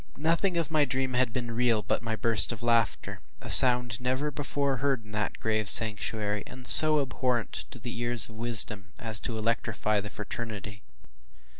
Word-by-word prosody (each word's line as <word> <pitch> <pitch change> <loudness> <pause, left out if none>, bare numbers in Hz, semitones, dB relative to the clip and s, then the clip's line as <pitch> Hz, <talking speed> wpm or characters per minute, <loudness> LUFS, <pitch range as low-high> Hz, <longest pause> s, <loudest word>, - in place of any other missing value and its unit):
Nothing 170 +4 -1
of 165 -2 -3
the 155 -2 +1
dream 130 0 -3
had 125 -1 -1
been 120 0 -6
real 115 -2 -1
but - - -3
my 115 -1 -4
burst 115 +1 +1
of 115 -1 -9
laughter, 115 -1 -2 0.2
a - - -8
sound 125 -2 +5
never 130 +4 -3
before 140 -1 -3
heard 135 -4 -3
in 105 - -16
that 105 -1 -5
grave 110 -2 -3
sanctuary, 105 -1 0
and 130 -1 -13
so 155 +2 +9
abhorrent 125 -4 -4
to - - -11
the 120 +1 -9
ears 120 0 -1
of 110 - -16
wisdom, 110 -3 -1
as 110 -6 0
to 115 -1 -7
electrify 110 -1 -2
the 105 - -8
fraternity. 105 -1 -8
115 Hz, 175 wpm, -26 LUFS, 110-130 Hz, 0.2 s, so